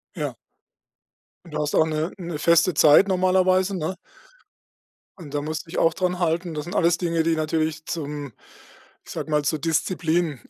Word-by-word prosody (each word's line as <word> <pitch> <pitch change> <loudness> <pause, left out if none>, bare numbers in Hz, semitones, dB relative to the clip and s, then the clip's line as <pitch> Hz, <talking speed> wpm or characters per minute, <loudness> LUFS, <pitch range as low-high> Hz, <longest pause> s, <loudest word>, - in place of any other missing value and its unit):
Ja. - - -4 1.1
Du 150 - -5
hast 150 0 -2
auch 160 - +4
'ne 155 +2 -2
'ne 170 -4 -5
feste 170 +2 +3
Zeit 150 +7 +6
normalerweise, 185 +1 +2
ne? 170 +3 -3 1.2
Und 155 -6 -11
da 145 - -1
musst 155 +2 -5
dich 165 - -7
auch 165 0 +3
daran 180 -1 -1
halten. 170 0 -1
Das 150 -1 -4
sind 175 - -7
alles 170 0 +3
Dinge, 165 -2 0
die 165 0 +1
natürlich 155 0 -1
zum 145 -4 -5 0.7
ich - - -11
sage 155 - -5
mal, 150 -1 +2
zur 150 +1 -1
Disziplin 165 -1 0
165 Hz, 165 wpm, -23 LUFS, 155-175 Hz, 1.2 s, Zeit